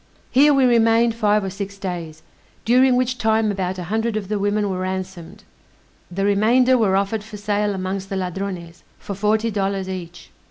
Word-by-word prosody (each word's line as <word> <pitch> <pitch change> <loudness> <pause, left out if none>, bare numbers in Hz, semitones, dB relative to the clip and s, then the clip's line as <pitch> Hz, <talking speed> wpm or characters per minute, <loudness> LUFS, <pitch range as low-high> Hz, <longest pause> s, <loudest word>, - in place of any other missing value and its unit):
Here 290 +3 +5
we 275 -2 +4
remained 230 -1 +4
five 210 -2 +1
or 190 - -3
six 200 +1 -6
days, 170 -5 -6 0.4
during 250 +2 +4
which 250 0 0
time 220 -1 +2
about 190 -2 -3
a 180 - -5
hundred 220 +4 -1
of 200 -3 -5
the 210 -1 -1
women 205 +1 0
were 185 -2 -3
ransomed; 185 +1 -5 0.7
the 195 +2 -2
remainder 235 +6 +4
were 210 -6 +2
offered 200 +2 -1
for 215 -1 -10
sale 205 0 -1
amongst 190 +1 -4
the 195 - -3
Ladrones, 180 -2 -5 0.2
for 200 - -7
forty 215 +3 0
dollars 195 -2 -2
each. 175 -2 -8
200 Hz, 175 wpm, -21 LUFS, 190-225 Hz, 0.7 s, Here